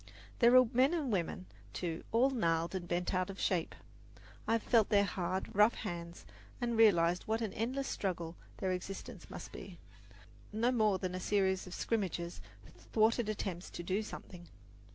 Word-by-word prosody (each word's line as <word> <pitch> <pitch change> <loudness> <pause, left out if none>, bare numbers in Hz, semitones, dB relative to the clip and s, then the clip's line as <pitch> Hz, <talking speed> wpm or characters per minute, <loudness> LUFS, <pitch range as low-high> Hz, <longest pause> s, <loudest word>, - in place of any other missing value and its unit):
There 240 +1 +7
are 255 - +8
men 260 +7 +4
and 290 -7 -1
women, 185 -1 -1 0.3
too, 170 -2 -3
all 250 +4 +4
gnarled 165 -8 0
and 180 -2 -4
bent 175 +2 -1
out 185 0 0
of 195 - -7
shape. 175 -4 0 0.7
I - - +2
have 230 - +1
felt 225 -4 +4
their 200 -1 +5
hard, 185 -1 -2
rough 210 +3 +5
hands 170 -4 -6 0.3
and 240 -2 -1
realized 180 -6 +4
what 220 +1 +1
an 220 -4 -3
endless 260 +5 -2
struggle 170 -4 -3 0.2
their 190 - -1
existence 185 +2 -6
must - - -8
be - - -9 0.7
no 225 +4 +1
more 215 -5 +3
than 185 -1 -3
a 185 - -3
series 190 -1 +1
of 185 - -7
scrimmages, 180 -6 -2 0.5
thwarted 220 0 +3
attempts 190 -4 -4
to 175 - -7
do 190 +4 0
something. 180 -4 -9
195 Hz, 170 wpm, -34 LUFS, 175-225 Hz, 0.7 s, are